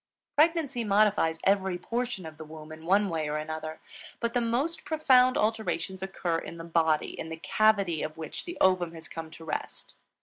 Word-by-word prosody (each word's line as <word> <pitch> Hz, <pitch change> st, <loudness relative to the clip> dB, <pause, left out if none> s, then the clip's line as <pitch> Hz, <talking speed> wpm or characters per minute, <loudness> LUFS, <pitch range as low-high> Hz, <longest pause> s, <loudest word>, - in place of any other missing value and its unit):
Pregnancy 300 Hz, -5 st, +2 dB
modifies 200 Hz, -6 st, +3 dB
every 190 Hz, -2 st, +2 dB
portion 235 Hz, 0 st, -3 dB
of 160 Hz, -1 st, -9 dB
the -, -, -6 dB
womb 155 Hz, 0 st, -11 dB
in 160 Hz, +1 st, -10 dB
one 200 Hz, +2 st, +4 dB
way 160 Hz, -4 st, -2 dB
or 150 Hz, -, -1 dB
another; 155 Hz, +1 st, -5 dB, 0.4 s
but 235 Hz, 0 st, -1 dB
the 245 Hz, -, +2 dB
most 250 Hz, +8 st, -1 dB
profound 260 Hz, -5 st, +4 dB
alterations 215 Hz, -3 st, -1 dB
occur 180 Hz, -3 st, -1 dB
in 170 Hz, -, -8 dB
the 165 Hz, -, -7 dB
body, 160 Hz, -2 st, +1 dB
in 160 Hz, -, -5 dB
the 160 Hz, -, -5 dB
cavity 200 Hz, -3 st, +2 dB
of 155 Hz, +1 st, -4 dB
which 160 Hz, -1 st, -6 dB
the 350 Hz, 0 st, -6 dB
ovum 180 Hz, -3 st, +3 dB
has 160 Hz, -1 st, -10 dB
come 165 Hz, -1 st, -7 dB
to 160 Hz, +1 st, -12 dB
rest. 155 Hz, -, -5 dB
185 Hz, 190 wpm, -28 LUFS, 160-230 Hz, 0.4 s, one